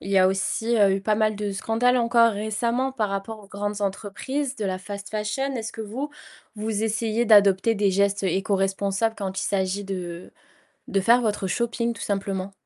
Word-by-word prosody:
Il 195 - -7
y 195 - +4
a 185 - +6
aussi, 225 +4 0
heu, 200 -2 +5
eu - - -4
pas 210 +2 +1
mal 215 0 +1
de 205 -1 -3
scandales 230 +5 +1
encore 230 -1 +4
récemment 230 +5 -1
par 225 -6 -1
rapport 195 +3 -4
aux 205 - -15
grandes 205 +1 -4
entreprises 250 +8 -3
de 215 - -3
la 185 -1 -1
fast 200 +1 -8
fashion. 215 +6 -2
Est-ce 225 -2 -4
que 225 - -8
vous, 250 +8 -4 0.5
vous 215 0 -2
essayez 225 +1 0
d'adopter 205 0 +5
des 200 -1 +2
gestes 200 0 +1
éco-responsables 195 +3 0
quand 190 -2 -4
il - - -2
s'agit 195 0 -1
de 180 -3 -6 0.6
de 195 - +1
faire 235 +5 +5
votre 210 -4 -1
shopping, 235 +3 -1
tout 215 - -9
simplement? 195 -1 -2
205 Hz, 190 wpm, -24 LUFS, 195-230 Hz, 0.6 s, a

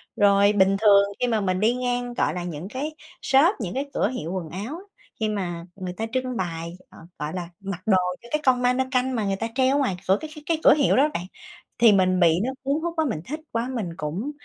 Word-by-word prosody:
Rồi 200 0 +4
bình 195 -1 +3
thường 200 -2 +7 0.2
khi 250 - +1
mà 225 -3 +1
mình 185 -2 0
đi 220 +4 +3
ngang, 245 -1 -2
gọi - - 0
là, 180 - -4
những 170 0 -6
cái 290 +6 -4 0.3
shop, 295 +9 +4
những 195 -7 -4
cái 275 +3 -3
cửa - - +1
hiệu 170 -10 -5
quần 180 -4 -4
áo, 215 - -6 0.4
khi 220 -1 0
mà 175 -5 -3
người 185 -2 -5
ta 220 +5 -3
trưng 255 -1 -2
bày, 170 -2 -4 0.2
à, - - -17 0.2
gọi 150 +1 -4
là, 175 -2 -5
mặc 195 -2 -6
đồ 195 -4 +4 0.2
cho 235 - -14
cái 305 - 0
con 255 -2 +4
ma-nơ-canh 255 +1 +1
mà 220 -3 -1
người 195 -1 0
ta 225 +4 -3
treo 265 +1 +3
ở - - +2
ngoài 225 -10 0
cửa 190 +1 +4
cái 315 - -6
cái 300 - -11
cái 325 -1 0
cửa - - +8
hiệu 290 -3 +3
đó 285 +4 +4
bạn, 175 - -3 0.5
thì 235 -2 +6
mình 185 -2 +3
bị 170 -1 +4
nó 260 - -1
cuốn 280 +3 0
hút 340 0 -2
quá, 320 -1 +1
mình 220 - -2
thích 305 +3 -5
quá 230 +1 -1
mình 210 -7 -2
cũng, 175 - -3
220 Hz, 250 wpm, -24 LUFS, 185-260 Hz, 0.5 s, cửa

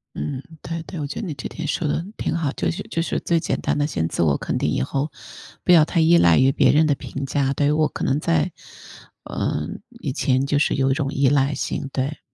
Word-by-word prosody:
嗯， 130 - -4 0.2
对 165 0 -5
对， 175 +1 -8
我 145 - -2
觉 145 - -5
得 220 - -4
你 165 - -3
这 135 - -6
点 165 - -6
说 165 - -1
得 160 +3 -1
挺 - - -2
好， 165 -4 0
就 - - -2
是 190 +5 -4
就 165 - -1
是 165 - -1
最 170 - +1
简 165 - -2
单 - - 0
地 145 - +2
先 80 - -1
自 - - -1
我 75 -4 +3
肯 - - -2
定 - - 0
以 - - 0
后， 135 - -1 0.5
不 - - 0
要 165 -3 +8
太 165 - 0
依 165 +2 +6
赖 85 - +5
于 130 +1 +5
别 - - +4
人 155 +2 +5
的 145 -2 +2
评 135 +1 -6
价， 135 0 0
对， 145 +1 +2
我 155 0 +3
可 - - -7
能 135 - +1
在， 80 - +1 0.7
呃， - - -2 0.3
以 - - -2
前 130 -1 +1
就 145 0 +1
是 145 - +2
有 135 0 +2
一 - - +3
种 140 -1 -2
依 140 -1 +3
赖 140 0 +2
性， 140 +1 -3
对。 140 +2 -2
145 Hz, 270 characters per minute, -22 LUFS, 135-160 Hz, 0.7 s, 要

